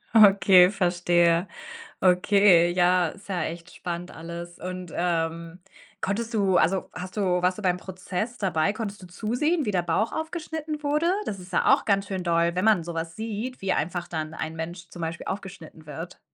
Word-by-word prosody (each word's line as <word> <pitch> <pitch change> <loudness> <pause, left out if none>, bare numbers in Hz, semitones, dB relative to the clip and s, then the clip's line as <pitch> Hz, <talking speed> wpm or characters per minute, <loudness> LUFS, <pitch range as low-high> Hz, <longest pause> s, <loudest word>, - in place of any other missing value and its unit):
Okay, 195 -3 +7
verstehe. 175 -2 +2 0.5
Okay, 180 -1 +5
ja, 180 -1 +3
ist 200 +4 -12
ja 185 -3 -1
echt 170 +1 -7
spannend 175 0 -5
alles, 170 +1 -8
und, 185 -1 -6
ähm, 170 0 -2 0.4
konntest 225 +4 -2
du 195 -4 +2
also, 190 +3 +2
hast 185 +3 -7
du - - +1 0.2
warst 185 +2 +1
du - - -6
beim 180 -1 +2
Prozess 190 +5 -5
dabei? 185 -1 +1
Konntest 210 -2 -6
du - - -9
zusehen, 245 - -1
wie 210 - +1
der 180 -3 +1
Bauch 175 +7 0
aufgeschnitten 315 -2 -4
wurde? 300 +4 +1 0.2
Das 195 - -3
ist 180 +1 -12
ja - - +5
auch - - -3
ganz 200 -1 +1
schön 190 -2 -3
doll, 170 0 +2
wenn 185 +3 0
man 210 -7 +4
so 170 - -6
was 165 0 -4
sieht, 225 +3 -5
wie 195 -1 0
einfach 175 +2 -2
dann 155 -1 -4
ein 160 0 -5
Mensch 170 +1 -6
zum 175 0 -9
Beispiel 165 +1 -4
aufgeschnitten 190 -5 -7
wird. 160 +4 -8
180 Hz, 185 wpm, -26 LUFS, 170-205 Hz, 0.5 s, Okay